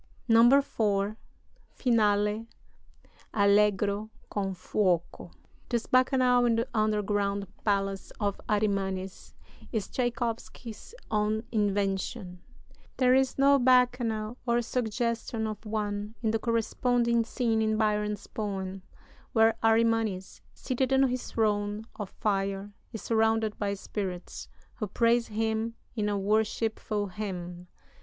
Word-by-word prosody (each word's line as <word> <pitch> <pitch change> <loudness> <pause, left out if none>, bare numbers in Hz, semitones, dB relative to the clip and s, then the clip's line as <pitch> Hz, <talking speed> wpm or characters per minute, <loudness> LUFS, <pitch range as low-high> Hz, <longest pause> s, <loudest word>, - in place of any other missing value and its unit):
IV 240 +4 +6 1.0
(Finale: 210 -2 +1 0.9
Allegro 205 0 +3 0.2
con 195 -2 -2
fuoco) 180 -3 -1 0.4
This 235 -2 -1
bacchanal 255 -1 +3
in 230 - +3
the 230 +2 0
underground 205 -2 0 0.2
palace 195 -2 0
of 200 -2 -1
Arimanes 195 -3 -1 0.4
is 220 -5 -2
Tschaikowsky's 235 - -4 0.2
own 215 +1 +1
invention; 195 -2 -1 0.6
there 255 -1 +4
is 265 0 +2
no 280 +1 +5
bacchanal, 245 -3 +2
or 240 0 +2
suggestion 230 -1 -2
of 215 -1 -5
one, 210 0 -3
in 220 - +2
the 225 - 0
corresponding 235 +1 +1
scene 225 -1 0
in 220 0 +1
Byron's 210 -1 0
poem, 195 -3 -4 0.5
where 225 0 +5
Arimanes, 225 -4 +1
seated 260 0 -2
on 265 0 +4
his 250 0 -3
throne 210 -1 0
of 205 -3 -5
fire, 195 -1 -2 0.2
is 220 - -7
surrounded 225 -1 +1
by 200 -1 -1
spirits, 190 -3 -5 0.3
who 215 - -3
praise 230 +3 +2
him 220 +1 -1 0.2
in 210 -2 0
a 205 - 0
worshipful 215 +1 0
hymn. 180 -3 -6
215 Hz, 110 wpm, -28 LUFS, 205-230 Hz, 1.0 s, IV